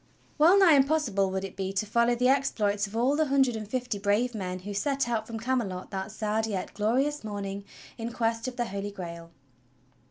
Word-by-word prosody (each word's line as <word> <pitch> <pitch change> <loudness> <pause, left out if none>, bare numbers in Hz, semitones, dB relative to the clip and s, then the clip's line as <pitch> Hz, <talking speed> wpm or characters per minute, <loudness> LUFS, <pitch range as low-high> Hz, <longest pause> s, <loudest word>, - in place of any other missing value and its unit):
^^^ELL 340 +6 +7
NIGH 350 -7 +7
impossible 270 -9 +2
would 190 0 -2
it 195 - -6
be 190 0 -3
to 195 +2 0
follow 235 +3 +2
the 250 +1 +2
exploits 210 -7 +1
of 200 - -13
Cv/ 225 - -1
all 260 +4 +3
the 310 +1 +2
hundred 270 -4 +2
and 215 -1 -5
fifty 245 -2 -2
brave 210 +5 +1
men 185 -4 -4
who 205 +2 -6
set 275 +5 0
out 225 -2 -1
from 225 -1 -5
Came 255 +3 +1
lot 185 -5 -5
that 195 +1 -4
sad 220 +1 -1
yet 195 -4 -4
glorious 260 +8 0
morning 200 -2 -5 0.4
in 230 +1 -3
Quest 230 +1 -1
of 255 - -5
the 240 - -1
Holy 200 -1 -4
Grail. 170 -4 -8
220 Hz, 215 wpm, -28 LUFS, 200-255 Hz, 0.4 s, ^^^ELL